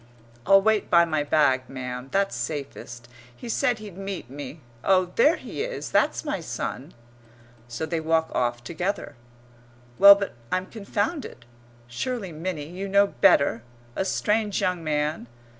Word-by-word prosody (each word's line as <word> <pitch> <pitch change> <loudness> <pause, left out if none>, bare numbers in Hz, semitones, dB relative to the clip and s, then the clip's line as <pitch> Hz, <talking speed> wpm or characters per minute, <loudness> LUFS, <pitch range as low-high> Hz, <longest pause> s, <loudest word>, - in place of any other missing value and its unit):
"I'll 195 0 +6
wait 220 -1 +2
by 170 0 +6
my 155 -3 0
bag, 140 -4 +2
ma'am, 125 -1 -6
that's 195 0 +1
safest. 135 -5 -6 0.3
He 240 - -10
said 245 +1 +1
he'd 205 -4 -10
meet 195 -10 -6
me.... 145 +2 -8 0.2
Oh, 185 -2 +3
there 300 +8 +5
he - - -7
is! - - -4
That's - - +1
my 295 -10 -2
son." 150 -2 -5 0.7
So 120 +7 -4
they 160 +1 -2
walk 160 0 +1
off 120 -1 -1
together. 170 +1 -3 0.8
Well, 200 0 +11
but 200 0 -4 0.2
I'm 185 0 0
confounded.... 205 - -4 0.4
Surely, 195 - -4
Minnie, 160 -1 -4
you 190 +3 -5
know 200 +1 +5
better! 160 - +3 0.3
A - - 0
strange 210 +1 0
young 180 -2 -1
man.... 150 -3 -1
175 Hz, 145 wpm, -25 LUFS, 145-200 Hz, 0.8 s, Well